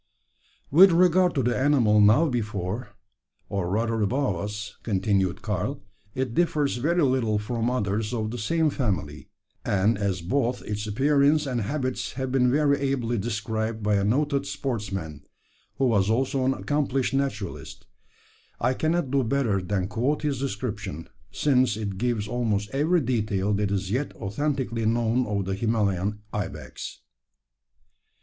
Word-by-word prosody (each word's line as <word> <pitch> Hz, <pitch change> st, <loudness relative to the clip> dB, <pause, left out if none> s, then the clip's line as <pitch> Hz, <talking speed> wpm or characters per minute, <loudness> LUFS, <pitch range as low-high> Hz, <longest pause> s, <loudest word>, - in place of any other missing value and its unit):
"With 185 Hz, +6 st, +8 dB
regard 180 Hz, +1 st, +4 dB
to 135 Hz, -, +1 dB
the 120 Hz, +1 st, +1 dB
animal 125 Hz, -7 st, +4 dB
now 110 Hz, +11 st, +5 dB
before, 110 Hz, -, -3 dB, 0.6 s
or 100 Hz, -4 st, -2 dB
rather 115 Hz, +3 st, 0 dB
above 125 Hz, 0 st, +1 dB
us," 105 Hz, +4 st, -5 dB
continued 95 Hz, -3 st, 0 dB
Karl, 105 Hz, +5 st, -2 dB, 0.3 s
"it 130 Hz, -2 st, -2 dB
differs 150 Hz, -4 st, +1 dB
very 165 Hz, +7 st, +1 dB
little 125 Hz, -5 st, +2 dB
from 115 Hz, +2 st, -1 dB
others 105 Hz, -3 st, -1 dB
of 110 Hz, -3 st, -2 dB
the 120 Hz, -, -5 dB
same 160 Hz, +7 st, +1 dB
family; 95 Hz, -, -3 dB, 0.3 s
and 100 Hz, 0 st, +1 dB
as 95 Hz, -3 st, -1 dB
both 125 Hz, +7 st, -1 dB
its 105 Hz, 0 st, -4 dB
appearance 145 Hz, +6 st, +3 dB
and 125 Hz, -4 st, -1 dB
habits 130 Hz, +3 st, -2 dB
have 130 Hz, 0 st, -3 dB
been 125 Hz, -1 st, +3 dB
very 140 Hz, +1 st, +3 dB
ably 125 Hz, -4 st, -1 dB
described 110 Hz, 0 st, -3 dB
by 105 Hz, 0 st, +2 dB
a 100 Hz, -1 st, +2 dB
noted 140 Hz, +6 st, +1 dB
sportsman, 95 Hz, -, -4 dB, 0.5 s
who 135 Hz, -, +1 dB
was 105 Hz, -5 st, +2 dB
also 130 Hz, +3 st, +1 dB
an 135 Hz, +1 st, +2 dB
accomplished 135 Hz, -3 st, -1 dB
naturalist, 115 Hz, -9 st, -3 dB, 0.7 s
I 125 Hz, +2 st, +2 dB
cannot 160 Hz, 0 st, 0 dB
do 140 Hz, -1 st, +3 dB
better 115 Hz, -6 st, +1 dB
than 95 Hz, 0 st, -1 dB
quote 125 Hz, +9 st, -1 dB
his 140 Hz, -4 st, -1 dB
description: 105 Hz, -, -4 dB, 0.2 s
since 130 Hz, -6 st, +2 dB
it 100 Hz, -3 st, -4 dB
gives 115 Hz, -3 st, -1 dB
almost 110 Hz, -3 st, -1 dB
every 160 Hz, +5 st, +2 dB
detail 105 Hz, -5 st, 0 dB
that 105 Hz, 0 st, 0 dB
is 100 Hz, -1 st, -2 dB
yet 135 Hz, +6 st, -2 dB
authentically 115 Hz, 0 st, -2 dB
known 115 Hz, +2 st, +1 dB
of 100 Hz, -2 st, -1 dB
the 95 Hz, -, -2 dB
Himalayan 105 Hz, -1 st, 0 dB
ibex. 105 Hz, -3 st, -6 dB
115 Hz, 145 wpm, -26 LUFS, 105-135 Hz, 0.7 s, With